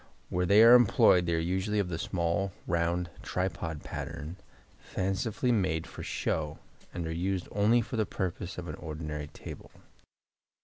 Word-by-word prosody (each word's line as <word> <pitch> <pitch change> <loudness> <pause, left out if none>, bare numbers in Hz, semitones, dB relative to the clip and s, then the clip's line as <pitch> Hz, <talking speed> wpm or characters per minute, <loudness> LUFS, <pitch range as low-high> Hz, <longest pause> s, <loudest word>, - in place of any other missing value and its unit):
Where 90 0 0
they 105 +4 +7
are 115 +1 +9
employed 100 -7 +6
they 85 - +2
are - - +1
usually 95 +5 0
of 100 -3 +1
the 80 -2 -3
small 85 +2 -1
round 85 +1 0
tripod 90 -4 -3
pattern, 80 +3 -6 0.4
fancifully 105 +6 -1
made 80 -8 +1
for - - -9
show, 75 -1 -2 0.3
and 85 - -4
are 80 - -3
used 90 +2 -1
only 110 +4 +4
for 115 - -5
the 110 - +2
purpose 90 -1 -4
of 90 -1 -6
an - - -4
ordinary 75 -2 -5
table. - - -10
90 Hz, 160 wpm, -30 LUFS, 80-100 Hz, 0.4 s, are